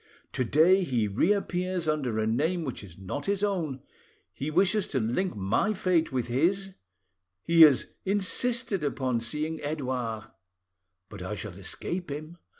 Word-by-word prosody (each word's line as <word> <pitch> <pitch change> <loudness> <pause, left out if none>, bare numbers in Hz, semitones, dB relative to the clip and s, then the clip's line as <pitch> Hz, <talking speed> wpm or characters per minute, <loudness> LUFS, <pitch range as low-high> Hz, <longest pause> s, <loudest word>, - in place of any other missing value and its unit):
To 130 - 0
day 165 +10 +4
he 120 -9 0
reappears 180 - 0
under 140 -7 0
a 110 - +1
name 155 +10 0
which 130 -7 -5
is 90 -4 -12
not 95 +10 -5
his 200 0 0
own: 165 -10 -1 0.5
he 140 - -4
wishes 190 +5 +2
to 135 - -1
link 120 - -1
my 100 - +1
fate 180 -5 +1
with 130 -2 -1
his; 185 +10 0 0.7
he 165 0 +4
has 150 -5 +6
insisted 205 0 0 0.2
on 130 -3 +1
seeing 150 +8 -3
Edouard. 130 -7 -3 0.8
But 105 -3 -10
I 95 +4 -4
shall 105 -2 -6
escape 170 - -4
him. 155 +4 -7
155 Hz, 150 wpm, -28 LUFS, 120-185 Hz, 0.8 s, has